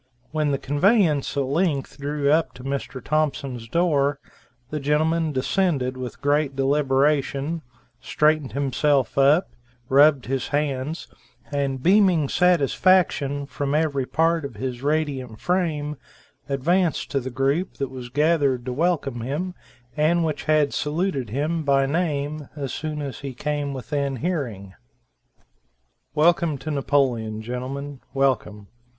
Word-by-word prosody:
When 155 -2 0
the 140 - +1
conveyance 150 - +2
at 140 - +2
length 145 0 -1
drew 145 0 0
up 155 -5 +2
to 125 - -11
Mr. 135 -2 -4
Thompson's 140 -6 -1
door, 145 -1 +2 0.5
the 150 - -2
gentleman 155 +3 +1
descended 135 -2 0
with 130 -1 -7
great 145 -1 +1
deliberation, 140 +2 +1 0.4
straightened 155 -2 +1
himself 140 -1 +1
up, 145 +6 +4 0.4
rubbed 140 0 +5
his 130 0 -2
hands, 145 +1 -2 0.4
and 135 -2 -1
beaming 185 -6 +4
satisfaction 165 -3 +2
from 140 0 -2
every 145 -4 0
part 165 0 +1
of 140 -5 -6
his 125 +2 -4
radiant 140 -6 -1
frame, 155 -5 -1 0.5
advanced 165 +4 +1
to 140 - +1
the 130 0 -5
group 135 +8 0
that 135 -2 -3
was 125 -2 -8
gathered 145 -3 +2
to 125 - -3
welcome 145 -5 0
him, 150 +10 -3 0.4
and 165 +3 +2
which 155 -2 -3
had 155 -2 +3
saluted 150 - -1
him 150 +8 -1
by 140 -2 +3
name 150 -2 -2
as 140 -4 -4
soon 150 -1 -4
as 140 -2 -6
he 135 -3 -6
came 145 +1 -2
within 140 +1 -2
hearing. 125 - -3 1.4
"Welcome 160 -1 +3
to 155 +3 -5
Napoleon, 125 -7 0
gentlemen, 130 +4 -5 0.2
welcome. 115 -6 0
145 Hz, 130 wpm, -23 LUFS, 135-155 Hz, 1.4 s, rubbed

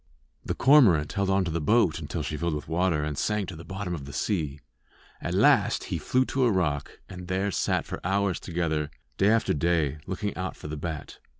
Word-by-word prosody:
The - - -3
cormorant 110 - +5
held 100 -1 0
on 95 -1 +2
to 85 - -2
the 85 0 -1
boat 95 -1 +3
until - - -4
she 75 - -3
filled 85 0 -1
with 75 - -6
water 85 -1 +1
and 75 -1 -2
sank 105 +4 -1
to 90 - -7
the 80 - -9
bottom 95 0 -5
of 75 -5 -5
the 70 - -9
sea. 75 - -1 0.6
At - - -2
last - - +4
he - - -1
flew 130 +1 +1
to 130 -1 +1
a 120 - +3
rock, 75 -7 -1
and 90 -1 -9
there 95 +2 0
sat - - 0
for - - -6
hours 95 0 0
together, 80 -4 -2 0.3
day 100 - +5
after 115 +1 +3
day, 75 -2 +1
looking - - -3
out - - -4
for - - -9
the 75 - -4
bat. 80 0 -6
85 Hz, 215 wpm, -27 LUFS, 75-100 Hz, 0.6 s, cormorant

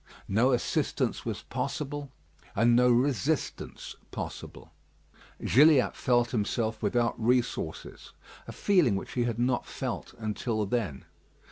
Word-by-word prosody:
No 115 +7 +3
assistance 125 - 0
was - - -4
possible, 145 -1 -4 0.4
and 120 +3 +4
no 125 +1 +5
resistance 135 +4 0
possible. - - -7 0.7
Gilliatt 145 +2 +5
felt 120 -2 +2
himself 110 0 -1
without 115 +2 0
resources; 120 -9 -1 0.4
a - - -6
feeling 175 - +3
which 95 - -5
he 120 -1 0
had 120 -2 -2
not 120 +1 0
felt - - -5
until 110 0 -2
then. 95 - -2
120 Hz, 115 wpm, -29 LUFS, 110-130 Hz, 0.7 s, no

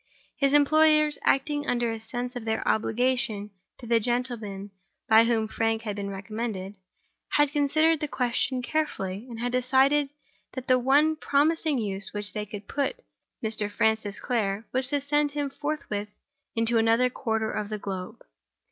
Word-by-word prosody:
His 275 0 +2
employers 305 0 +4
(acting 290 +2 +1
under 240 -1 +1
a 225 -1 -5
sense 245 +3 -4
of 245 - -5
their 220 0 -2
obligation 225 -2 0 0.3
to 245 - -11
the 230 0 +3
gentleman 225 -4 -3 0.4
by 225 +1 +7
whom 225 -2 +1
Frank 225 0 -1
had 210 -3 -3
been 200 -1 -4
recommended) 200 0 -5 0.6
had 290 -1 +4
considered 310 +2 +3
the 300 - -2
question 250 -1 -1
carefully, 245 -8 -2
and 230 -2 -7
had 245 +1 -1
decided 265 +3 +3 0.4
that 260 -1 -6
the 255 -1 +4
one 290 +5 +4
promising 305 0 +2
use 200 -4 -3
to - - -7
which 205 -2 -3
they 210 0 -4
could 205 -1 -8
put 280 -1 -1 0.5
Mr. 215 -2 -1
Francis 220 -1 0
Clare 215 -3 -1
was 260 0 +1
to 285 +1 0
send 295 +1 +1
him 290 -2 -2
forthwith 275 -9 -4 0.5
into 230 0 +2
another 230 +3 +3
quarter 220 -3 -1
of 210 -1 -3
the 215 - -3
globe. 190 -2 -6
240 Hz, 160 wpm, -27 LUFS, 215-280 Hz, 0.6 s, by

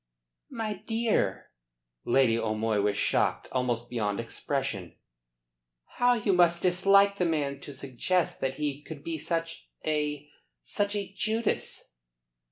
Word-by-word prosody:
"My 215 -4 -4
dear!" 225 - 0 0.5
Lady 125 -2 +4
O'Moy 110 -1 0
was 100 0 +1
shocked - - +1
almost 120 -2 -1
beyond 105 -4 -1
expression. 115 - -3 1.0
"How 245 0 +4
you 210 -4 +1
must 170 -1 +4
dislike 195 +2 +5
the 180 - +1
man 145 -4 -1
to 145 - -8
suggest 140 +6 -1
that 135 0 -1
he 145 -1 -2
could 150 -1 -9
be 165 -1 -3
such 165 0 -3 0.2
a 150 -1 -1 0.4
such 205 0 -1
a 200 -2 -4
Judas." 220 +2 -1
150 Hz, 125 wpm, -28 LUFS, 125-195 Hz, 1.0 s, dislike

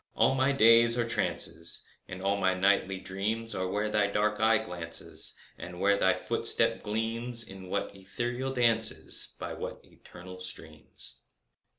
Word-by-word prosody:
And - - +2
all - - +3
my 135 +1 +2
days 115 -2 +5
are 120 -1 0
trances, 85 -7 -1 0.2
And 90 +1 -8
all 100 +1 +1
my 95 -2 +1
nightly 95 0 +1
dreams 110 +5 -4
Are 95 0 -2
where 105 +3 -2
thy 105 -1 +1
dark 105 +1 -1
eye 110 0 +4
glances, 90 -6 -4 0.2
And 90 0 -9
where 100 +1 +3
thy 95 -2 +2
footstep - - +3
gleams— 115 +2 -1
In 95 -3 -10
what 100 +1 -3
ethereal 120 +7 -4
dances, 115 -3 +3
By - - -5
what - - -7
eternal 90 +1 -13
streams. 75 -8 -9
100 Hz, 155 wpm, -28 LUFS, 95-115 Hz, 0.2 s, days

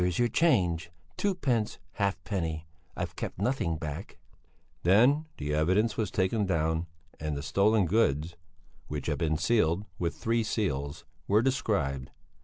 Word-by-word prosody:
where? 90 - +3
"Here's 90 - -1
your 120 -1 +3
change, 90 - +2 0.3
twopence 135 - 0
halfpenny; 95 -5 -2 0.3
I've - - -3
kept - - -5
nothing 100 -6 0
back." 75 +4 -6 0.6
Then 125 - +4
the 75 +1 -2
evidence 95 +9 +2
was 110 -4 -1
taken 100 +3 +1
down 80 -1 0 0.3
and 75 -1 -2
the 70 - -5
stolen 100 +8 +3
goods 85 -5 +1 0.5
which 75 -2 -4
had - - -1
been 80 -2 +1
sealed 95 0 +2
with 85 -1 -1
three 115 +1 +1
seals 70 -11 -2 0.2
were 105 +3 +4
described. 90 - 0
95 Hz, 140 wpm, -29 LUFS, 80-110 Hz, 0.6 s, Then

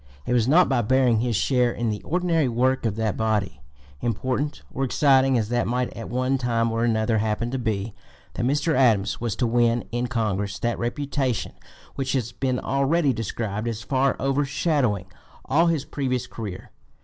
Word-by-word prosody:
It 125 - -1
was 120 -2 +2
not 170 +6 +5
by 130 -3 +2
bearing 125 0 +3
his 120 0 0
share 125 +2 +2
in 120 -1 -2
the 105 - -4
ordinary 170 -5 +1
work 125 +1 +1
of 105 - -2
that 110 -3 -1
body, 105 -11 -1 0.4
important 130 +6 -2
or 135 - -2
exciting 135 -1 +3
as 110 -2 -1
that 120 0 0
might 125 +1 -1
at 115 - -7
one 130 +2 0
time 115 -2 0
or 115 +1 0
another 110 -1 +1
happen 110 +2 -1
to 130 - -2
be, 110 -3 -2 0.4
that - - -3
Mr. 145 +5 +1
Adams 110 -8 +2
was 115 -4 -1
to 125 - 0
win 120 0 +2
in 120 +1 -1
Congress 105 -4 -1
that 120 0 -2
reputation 130 -1 -2 0.4
which 135 -1 -2
has 120 -4 -1
been 130 0 -1
(p. - - -3
243) 135 - -1
already 155 -3 +2
described 110 -1 -3
as 115 -1 -3
far 135 0 +1
overshadowing 135 - 0 0.4
all 160 +6 +3
his 160 -4 0
previous 130 -3 -2
career. 105 -5 -8
120 Hz, 185 wpm, -24 LUFS, 110-135 Hz, 0.4 s, not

